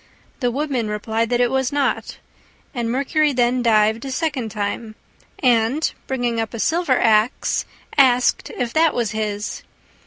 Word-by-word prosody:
The 245 -4 +1
Woodman 265 -3 -2
replied 220 +2 -2
that 245 - +1
it 245 0 +2
was 265 -1 0
not, 285 -1 -1 0.6
and 240 -4 -2
Mercury 285 +3 +1
then 245 0 +2
dived 220 -1 +3
a 275 - -5
second 265 -5 -2
time, 215 +1 -4 0.4
and, 245 +4 +2
bringing 245 -3 -1
up 225 +1 -5
a - - -6
silver 320 -1 +1
axe, 220 +2 +2 0.3
asked 250 -2 +3
if 240 -2 -2
that 320 0 +3
was 235 -3 0
his. 210 -1 -3
245 Hz, 150 wpm, -21 LUFS, 225-265 Hz, 0.6 s, dived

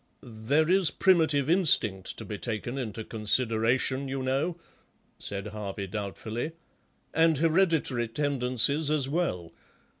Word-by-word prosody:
"There 125 +7 0
is 185 -2 +3
primitive 160 -7 +2
instinct 135 - +3
to - - -7
be 105 -2 -6
taken 120 +2 -4
into 110 -3 -5
consideration, 115 +4 0
you 135 0 -3
know," 140 +7 -1 0.6
said 100 0 -4
Harvey 100 -2 -5
doubtfully, 110 - -5 0.6
"and 160 -1 +3
hereditary 160 -7 +1
tendencies 140 +3 +1
as 150 -3 +1
well. 135 - -2
130 Hz, 115 wpm, -28 LUFS, 110-155 Hz, 0.6 s, is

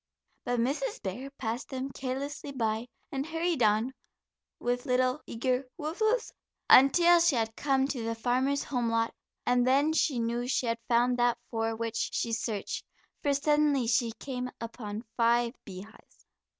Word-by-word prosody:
But 245 -1 0
Mrs. 295 - -1
Bear 230 +8 -4
passed 245 -3 -4
them 265 0 -4
carelessly 275 +2 -4
by, 225 -2 -1 0.2
and 270 -1 -2
hurried 325 -1 -1
on, 220 +4 +3 0.6
with 245 +3 -2
little 255 +3 +2
eager 255 +2 -1
"woof, 315 +5 -5
woof's," 440 +2 +1 0.4
until 340 +7 +7
she 335 -4 +4
had 225 -1 -1
come 270 -2 +1
to 260 -5 -3
the 230 0 -2
farmer's 255 +4 +1
home 245 -4 -1
lot, 230 0 +1 0.3
and 245 0 +3
then 285 +4 +3
she 300 -4 +2
knew 235 +1 -1
she 255 - 0
had 230 0 -1
found 245 +1 +3
that 240 0 +3
for 225 -1 -1
which 230 0 -2
she 230 - -1
searched, 215 -3 -3 0.4
for 285 - +1
suddenly 295 -2 +2
she 230 0 +2
came 250 0 -5
upon 225 -2 -6
five 235 0 +3
beehives. 195 +3 -12
250 Hz, 155 wpm, -29 LUFS, 230-275 Hz, 0.6 s, until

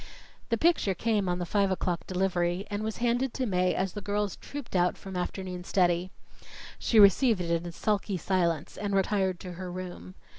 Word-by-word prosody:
The 230 - +2
picture 310 - +2
came 210 -2 0
on 175 - 0
the 175 - -3
five 200 +3 +2
o'clock 180 -2 -2
delivery, 180 0 0
and 205 +1 -2
was 220 0 -3
handed 245 +2 0
to 260 - -1
Mae 185 -4 +1
as 190 -1 -1
the 205 - -5
girls 205 0 -1
trooped 280 -7 -8
out 180 0 +2
from 190 -2 -9
afternoon 180 0 -4
study. 180 -1 +1 0.7
She 225 - +3
received 210 +2 +6
it 170 -1 -2
in 175 - -5
sulky 200 +1 -1
silence 170 -4 0
and 205 -1 -2
retired 190 -2 +1
to 180 - -7
her 180 +1 -6
room. 185 0 -7
190 Hz, 185 wpm, -29 LUFS, 180-210 Hz, 0.7 s, received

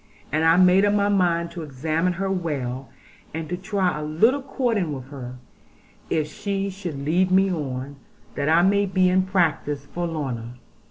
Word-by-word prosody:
And 155 +1 +1
I 165 +1 +5
made 185 +1 +6
up 205 0 +3
my 205 0 +2
mind 170 -4 +1
to 170 -1 -7
examine 155 +5 -1
her 190 +2 -2
well, 135 -8 -3 0.5
and 165 +3 -4
try 190 -6 0
a - - -4
little 220 - +2
courting 235 - -1
with 130 0 -9
her, 125 -3 -7 0.7
if 155 -2 +1
she 195 +4 -3
should 175 -8 -6
lead 180 +5 +2
me 190 +1 +4
on, 140 -4 -4 0.4
that 140 +1 -1
I 165 +2 +5
might 200 0 +2
be 185 -1 +5
in 185 0 +2
practice 155 -6 0
for 175 +3 -3
Lorna. 125 -7 -4
170 Hz, 170 wpm, -24 LUFS, 150-190 Hz, 0.7 s, made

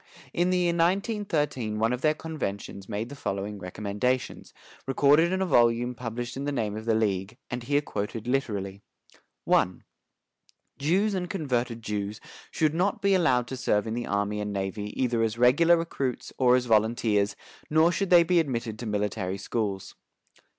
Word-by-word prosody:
In 175 +1 +1
the 185 - +2
year 175 -1 +2
1913 170 - 0
one 115 +3 +1
of 125 - -3
their 155 0 +3
conventions 100 -12 -5
made 110 +2 -3
the 140 - -8
following 100 -5 -4
recommendations, 105 +7 -2 0.4
recorded 145 +5 +4
in 190 0 +1
a - - 0
volume 120 -5 +3
published 120 0 -5
in 135 +1 -4
the 145 - -1
name 110 -6 -2
of 110 0 -6
the 115 -1 +2
league, 105 0 -1
and 120 0 -3
here 145 +4 +1
quoted 105 -3 -4
literally: 100 -7 -2 0.7
"I. - - +4 1.1
Jews 190 +9 +2
and 180 -2 -2
converted 125 - -2
Jews 105 0 -3 0.3
should 155 -1 +1
not 185 +5 0
be 200 0 +4
allowed 130 -10 +3
to 130 - -4
serve 105 -5 +1
in 110 - -3
the 120 +1 -3
army 100 +1 -1
and 105 0 -3
navy 100 +1 -3
either 120 -3 +1
as 115 0 0
regular 145 +8 +5
recruits 140 -7 -3
or 125 -1 +5
as 125 -1 +1
volunteers, 110 -2 +2 0.3
nor 160 +2 +4
should 195 +2 -1
they 175 -1 +7
be 175 +1 +3
admitted 115 -7 -2
to 120 - -5
military 105 -2 -2
schools. 100 -2 -3
120 Hz, 170 wpm, -27 LUFS, 105-155 Hz, 1.1 s, they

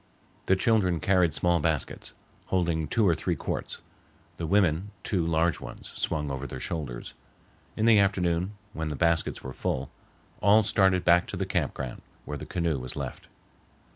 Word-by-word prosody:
The 95 - +5
children 95 -4 +2
carried 90 -1 +3
small 85 +2 +2
baskets, 80 -3 -2 0.3
holding 85 -4 0
two 105 +6 +2
or 85 - +5
three 85 +2 -1
quarts; - - -4 0.6
the 85 - -3
women 95 0 +2
two 90 -4 0
large 85 0 +2
ones - - -9
swung 75 -3 -2
over 70 +1 -4
their 65 - -7
shoulders. 70 -8 -5 0.6
In 110 - +1
the 115 -2 +7
afternoon, 95 -1 +1 0.2
when 80 0 -3
the 75 - -3
baskets 85 +3 +1
were 65 - -6
full, 65 +1 -2 0.5
all 105 +2 +6
started 95 -3 +3
back 90 0 +5
to - - -5
the - - -1
camp - - -1
ground, 65 -2 -5 0.2
where 75 - -4
the - - -8
canoe 85 -5 -1
was 65 0 -5
left. - - -6
85 Hz, 170 wpm, -28 LUFS, 75-95 Hz, 0.6 s, the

